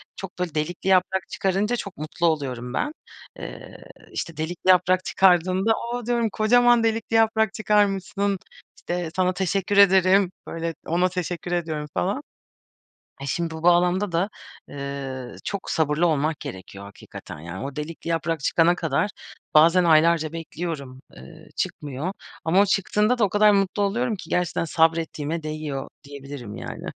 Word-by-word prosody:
çok 190 -2 -9
böyle 175 -4 -3
delikli 165 +5 -3
yaprak 190 0 +2
çıkarınca 200 +4 0
çok 200 -5 -6
mutlu 155 +3 -1
oluyorum 130 -6 -2
ben. 295 - -1 0.5
Eee, - - -9 0.3
işte 165 -3 -5
delikli 170 +4 -3
yaprak 185 0 +4
çıkardığında 185 +3 +3 0.2
o 245 -1 -4
diyorum, 235 -1 +1
"Kocaman 240 +2 +4
delikli 225 0 0
yaprak 220 -1 +3
çıkarmışsın, 200 -1 +1 0.4
işte 175 -2 -3
sana 185 0 +2
teşekkür 195 +2 -1
ederim." 190 -1 +5 0.2
Böyle 165 0 -4
ona 180 +3 +2
teşekkür 175 -1 -4
ediyorum 160 -4 -2
falan. 90 - -1 1.1
Şimdi 165 +4 -1
bu 160 - -7
bağlamda 175 +2 +3
da, 175 +4 +1 0.4
eee, 140 -2 -6
çok 200 -2 -4
sabırlı 160 +2 +2
olmak 155 -1 0
gerekiyor 95 +1 -8
hakikaten 100 -5 -11
yani. 85 +7 -7
O 140 - -8
delikli 155 +2 -6
yaprak 165 -1 -1
çıkana 165 +5 +3
kadar 165 +5 0 0.4
bazen 170 +4 +6
aylarca 160 -1 +4
bekliyorum, 155 -5 -6 0.2
ııı, 65 +1 -13
çıkmıyor. 150 +6 -3 0.3
Ama 170 +4 +4
o - - +2
çıktığında 210 +5 +1
da 225 - +4
o - - +2
kadar 210 +1 +5
mutlu 195 0 +1
oluyorum 225 +3 0
ki - - -11
gerçekten 180 -1 0
sabrettiğime 160 -1 0
değiyor 155 -3 -4 0.2
diyebilirim 140 -5 -9
yani. - - -7
175 Hz, 140 wpm, -24 LUFS, 155-195 Hz, 1.1 s, bazen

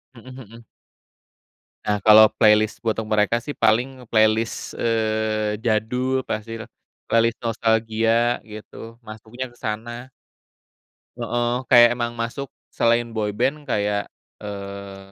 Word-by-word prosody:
Heeh 125 +2 -12
heeh. 115 -1 -13 1.2
Nah, 105 0 +1
kalau 110 0 +8
playlist 110 -1 +4
untuk 110 0 -1
mereka 105 +2 +2
sih 145 +4 -7
paling 125 +4 +1
playlist, 110 0 +1
eee, 110 -2 0
jadul 125 +4 0
pastilah, 115 +1 -5 0.4
playlist 115 0 +2
nostalgia 115 +1 +1
gitu, 115 +2 -11
masuknya 110 +3 -8
ke 120 - -22
sana. 120 +4 -6 1.1
Heeh, 120 0 -1 0.2
kayak 120 -1 +8
emang 120 -1 -3
masuk 120 +4 -4 0.2
selain 115 0 +1
boyband 110 +7 -2
kayak, 105 0 -1 0.3
eee, 100 -1 -8
115 Hz, 105 wpm, -22 LUFS, 110-120 Hz, 1.2 s, kalau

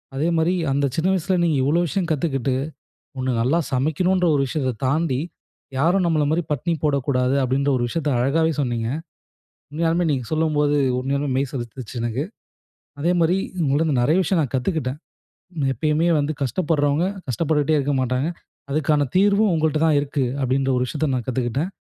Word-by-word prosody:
அதேமாதிரி, 165 +4 +1 0.2
அந்த 140 +1 +1
சின்ன 165 +3 +1
வயசுல 185 0 0
நீங்க 165 -3 +2
இவ்வளவு 165 +6 +2
விஷயம் 185 +1 -1
கத்துக்கிட்டு 135 -4 0 0.7
ஒண்ணு 130 0 -1
நல்லா 130 +8 +2
சமைக்கணுன்ற 175 +7 +1
ஒரு 140 - +2
விஷயத்த 130 -2 -1
தாண்டி 140 -1 +1 0.6
யாரும் 175 +6 +3
நம்பள 155 -3 +2
மாதிரி 165 +3 +1
பட்னி 150 +5 -1
போடக்கூடாது. 135 -3 +1
அப்படின்ற 135 +2 +1
ஒரு 120 - 0
விஷயத்த 150 +2 -1
அழகாகவே 160 +6 +2
சொன்னீங்க. 120 -4 -1 0.8
உண்மையாலுமே 165 +3 0
நீங்க 130 -4 -1
சொல்லும்போது, 150 -2 +1 0.2
உண்மையாலுமே 140 +2 -1
மெய் 135 0 0
சிலுத்துச்சு 120 -2 -6
எனக்கு. 120 +5 -2 0.8
அதேமாதிரி 175 +2 +2 0.3
உங்கள்கிட்டேந்து 145 -1 +1
நெறைய 150 +8 +3
விஷயம் 175 0 +1
நான் 135 - -5
கத்துக்கிட்டேன். 135 0 -2 0.7
எப்பயுமே 155 +3 +1
வந்து 145 +1 0
கஷ்டப்படுறவங்க 145 - +1 0.2
கஷ்டப்பட்டுட்டுகிட்டே 155 +2 +1
இருக்க 140 0 0
மாட்டாங்க. 130 +4 0 0.4
அதுக்கான 145 -1 +1
தீர்வும் 200 +2 +4
உங்கள்கிட்ட 155 -1 +1
தான் 150 -2 +3
இருக்கு. 140 -1 -1 0.2
அப்படின்ற 135 +1 +1
ஒரு 125 - +1
விஷயத்த 150 0 -1
நான் 125 -3 -4
கத்துக்கிட்டேன். 130 +6 -1
145 Hz, 145 wpm, -22 LUFS, 130-165 Hz, 0.8 s, தீர்வும்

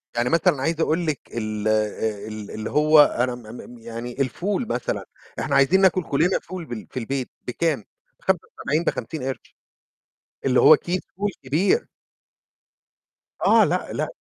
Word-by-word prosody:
يعني 120 +1 +1
مثلًا 165 -4 +2
عايز 165 +3 0
أقول 165 +2 +1
لِك 150 -5 0
ال 110 -2 -3
ال 110 -1 -2
اللي 110 0 -5
هو 155 +1 +5
أنا 125 -3 0
م 120 - -11
م 120 +2 -11
م - - -13
يعني 115 +3 -6
الفول 190 - -1
مثلًا، - - -2 0.3
إحنا 140 - -1
عايزين 140 +8 +5
ناكل 185 -1 +4
كلّنا 160 +6 +1
فول 180 -1 -8
بال 120 -6 -7
في - - -3
البيت، 130 +2 -3 0.2
بكام؟ 140 -1 0 0.4
ب75، 155 +3 -1
ب50 160 -3 -3
قِرش. 135 0 -6 0.9
اللي 130 -2 +4
هو 155 - +9
كيس 180 +4 -2 0.2
فول 205 +2 -1
كبير. 175 - +2 1.6
آه - - +6
لأ، - - -1
لأ. - - -1
140 Hz, 150 wpm, -23 LUFS, 115-165 Hz, 1.6 s, هو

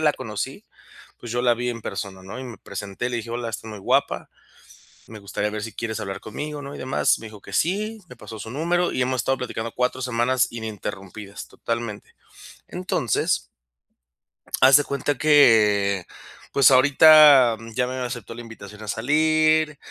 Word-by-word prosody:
la 155 -1 +3
conocí, 110 -7 -6 0.6
pues, 120 - -8
yo 120 - 0
la 120 -1 +4
vi 120 +1 -3
en 115 -2 -7
persona, 95 -2 -6
¿no?, 95 - -8
y - - -7
me 120 -5 -9
presenté 100 +4 -6
y - - -1
le 120 - -2
dije: 115 0 -7
"Hola, 120 0 -3
estás 110 0 -7
muy 105 - -8
guapa. - - 0 0.8
Me 110 - -10
gustaría 100 +1 -3
ver 105 0 -5
si 115 0 -6
quieres 110 -1 -4
hablar 95 -2 -5
conmigo, 145 +6 -6
¿no?", 140 0 -8
y - - -11
demás. 130 - +1
Me 115 - -9
dijo 105 -2 -12
que - - -12
sí, 215 +5 -1
me 125 - -12
pasó 110 -2 -10
su 110 - -7
número 170 +6 0
y - - -2
hemos 130 -1 0
estado 135 +3 0
platicando 115 -2 -4
4 125 +1 -1
semanas 125 +1 +1
ininterrumpidas, 105 -3 -7
totalmente. 115 -3 -5 0.5
Entonces 180 - -1 1.1
haz 130 +1 +8
de 145 - +3
cuenta 140 0 -2
que, 105 -10 +4
eh, - - -17 0.5
pues 140 -1 +6
ahorita, 140 -2 +7
mm, 115 0 -11
ya 125 +1 +1
me 130 - -5
aceptó 120 -3 -5
la 120 - -8
invitación 105 -2 -12
a 110 - -8
salir, 155 +5 +2
120 Hz, 185 wpm, -23 LUFS, 110-140 Hz, 1.1 s, haz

